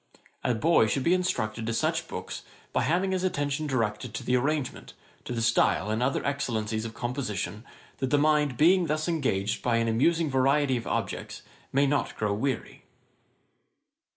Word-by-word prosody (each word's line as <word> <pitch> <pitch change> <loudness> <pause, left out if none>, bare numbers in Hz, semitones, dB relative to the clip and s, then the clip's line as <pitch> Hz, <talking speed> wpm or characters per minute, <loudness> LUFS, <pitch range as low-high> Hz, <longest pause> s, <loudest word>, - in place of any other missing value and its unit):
A 125 - +1
boy 150 -1 +4
should 130 +5 0
be 170 - +4
introduced 115 -12 -1
to 115 +1 -2
such - - 0
books, - - -6 0.3
by - - +2
having 185 +4 +1
his 185 -1 -1
attention 150 -4 -1
directed 115 -3 -2
to - - -4
the 125 +1 +1
arrangement, 140 +1 -1 0.3
to - - -6
the 115 -1 -1
style, 115 -2 +2
and 110 +2 -1
other 130 +2 0
excellencies 115 -6 -1
of 115 0 -7
composition; 115 -4 -3 0.4
that 130 - -1
the 145 - +3
mind 150 -3 +2
being 175 +4 +5
thus 155 +1 -1
engaged 130 - 0
by 120 -2 +1
an 115 0 +1
amusing 160 +9 +2
variety 135 +1 +3
of 120 - -4
objects, - - -3 0.3
may 140 +2 +3
not 145 +1 0
grow 105 -1 0
weary.' 130 +4 -3
130 Hz, 170 wpm, -27 LUFS, 115-150 Hz, 0.4 s, being